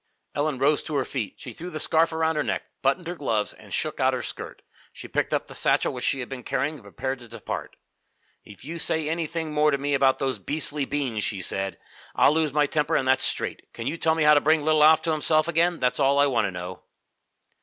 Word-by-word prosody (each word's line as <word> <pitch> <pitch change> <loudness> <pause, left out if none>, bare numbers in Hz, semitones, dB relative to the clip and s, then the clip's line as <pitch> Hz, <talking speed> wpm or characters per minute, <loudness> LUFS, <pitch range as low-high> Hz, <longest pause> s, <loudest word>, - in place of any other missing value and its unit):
Ellen 145 -1 -1
rose 145 +3 +2
to 155 - -5
her 135 -2 +1
feet. 120 -7 -4
She 125 - -9
threw 175 +8 -7
the 155 - -5
scarf 160 +2 +3
around 160 0 0
her 150 - +1
neck, - - -2 0.2
buttoned 140 +7 +1
her 175 - -3
gloves, 115 -10 -1
and - - -16
shook - - -2
out - - +3
her - - -4
skirt. - - -7 0.3
She - - -10
picked - - -1
up - - 0
the - - -12
satchel - - +1
which - - -6
she 135 - +1
had 125 - -5
been 135 -2 -7
carrying 145 +4 -1
and 145 -7 -12
prepared 130 +6 -4
to 120 - -13
depart. 115 +1 -6 0.7
"If 100 +3 -14
you 165 +3 -6
say 160 -1 0
anything 160 -1 -3
more 150 0 +4
to 140 - +1
me 145 +1 -2
about 135 -1 +3
your 135 -1 0
beastly 150 -1 +1
beans," 130 -8 -2
she 100 - -2
said, 95 +1 -1 0.4
"I'll 145 - +5
lose 155 -2 +1
my 150 +1 +3
temper, 150 +1 0
and 130 - +1
that's 130 0 +3
straight. - - -2
Can 115 - -7
you 145 +5 -1
tell 160 -1 +1
me 160 - +1
how 150 0 +7
to 145 - +5
bring 155 0 +3
little 155 0 +4
Alf 155 +1 +6
to 165 - 0
himself 155 +1 +2
again? 170 +1 +2
That's 125 +2 0
all 140 0 +3
I 140 - +5
want 125 -6 +1
to 100 - -2
know." 90 +1 -7
145 Hz, 245 wpm, -25 LUFS, 130-155 Hz, 0.7 s, how